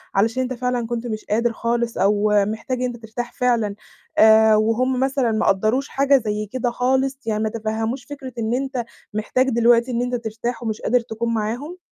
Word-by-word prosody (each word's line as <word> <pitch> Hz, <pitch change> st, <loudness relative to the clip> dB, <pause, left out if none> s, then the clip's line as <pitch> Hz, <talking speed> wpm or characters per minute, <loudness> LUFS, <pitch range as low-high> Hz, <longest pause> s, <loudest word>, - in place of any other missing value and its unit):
علشان 225 Hz, +6 st, +2 dB
أنت 255 Hz, 0 st, -3 dB
فعلًا 250 Hz, -1 st, -2 dB
كنت 240 Hz, +1 st, -3 dB
مش 215 Hz, -2 st, -5 dB
قادر 230 Hz, +2 st, +1 dB
خالص 235 Hz, +1 st, -1 dB
أو 205 Hz, +2 st, +2 dB, 0.2 s
محتاج 220 Hz, +5 st, -3 dB
إن -, -, 0 dB
أنت 245 Hz, -1 st, -4 dB
ترتاح 230 Hz, +2 st, -6 dB
فعلًا 235 Hz, -5 st, +1 dB, 0.4 s
آآ 220 Hz, 0 st, +7 dB
وهُم 235 Hz, +4 st, +1 dB
مثلًا 265 Hz, -2 st, +1 dB
ما 220 Hz, -, 0 dB
قدّروش 220 Hz, +8 st, +2 dB
حاجة 275 Hz, 0 st, +3 dB
زي 215 Hz, -3 st, -2 dB
كده 250 Hz, -1 st, -1 dB
خالص 265 Hz, +2 st, +1 dB
يعني 215 Hz, -1 st, 0 dB
ما 220 Hz, -, 0 dB
تفهّموش 225 Hz, +3 st, -3 dB
فِكرة 270 Hz, -2 st, -8 dB
إن 225 Hz, 0 st, -1 dB
أنت 260 Hz, -2 st, -2 dB, 0.3 s
محتاج 255 Hz, +5 st, +1 dB
دلوقتي 235 Hz, +1 st, +3 dB
إن 240 Hz, 0 st, 0 dB
أنت 245 Hz, 0 st, -1 dB
ترتاح 230 Hz, +1 st, -4 dB
ومش 220 Hz, -1 st, -3 dB
قادر 250 Hz, +3 st, +2 dB
تكون 230 Hz, 0 st, -3 dB
معاهم؟ 240 Hz, +10 st, -3 dB
235 Hz, 185 wpm, -21 LUFS, 220-250 Hz, 0.4 s, آآ